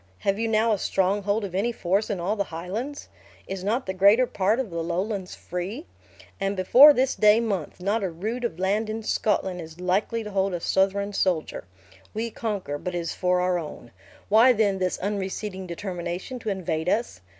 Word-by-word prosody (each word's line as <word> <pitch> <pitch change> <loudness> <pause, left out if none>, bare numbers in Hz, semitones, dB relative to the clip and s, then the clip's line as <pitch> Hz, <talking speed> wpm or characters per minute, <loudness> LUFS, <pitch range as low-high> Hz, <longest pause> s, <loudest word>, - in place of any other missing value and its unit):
Have 195 +1 0
you 225 - 0
now 220 +1 +2
a 205 - +1
stronghold 200 +3 0
of 190 - -7
any 205 +6 0
force 195 -1 0
in 200 -4 -2
all 190 +5 -1
the 200 -2 -1
Highlands? 200 - -5 0.4
Is 190 -1 -5
not 230 +6 0
the 190 - -3
greater 200 +6 +5
part 210 +1 0
of 245 -8 -3
the 170 0 -3
Lowlands 185 +3 -3
free? 190 - -5 0.5
And 195 +1 -1
before 250 +10 +8
this 265 -1 +1
day 210 +1 +5
month, 200 -10 -3
not 200 +5 0
a 190 - -1
rood 215 +9 -4
of 235 -9 -2
land 205 +4 0
in 220 +1 -4
Scotland 190 -4 0
is 160 +1 -11
likely 195 +5 0
to 210 - -7
hold 195 -1 0
a - - -3
Southron 195 +3 +1
soldier. 180 - -1 0.5
We 230 +1 -2
conquer, 200 -11 -3
but 180 +2 -4
it - - 0
is 170 -1 -3
for 180 0 +1
our 180 -1 +1
own. 150 -7 -9 0.4
Why 230 +5 +6
then 205 -4 +1
this 185 -1 0
unreceding 195 -1 -3
determination 180 +5 -5
to 225 - -4
invade 180 -4 -2
us? 225 - -1
195 Hz, 195 wpm, -25 LUFS, 180-220 Hz, 0.5 s, before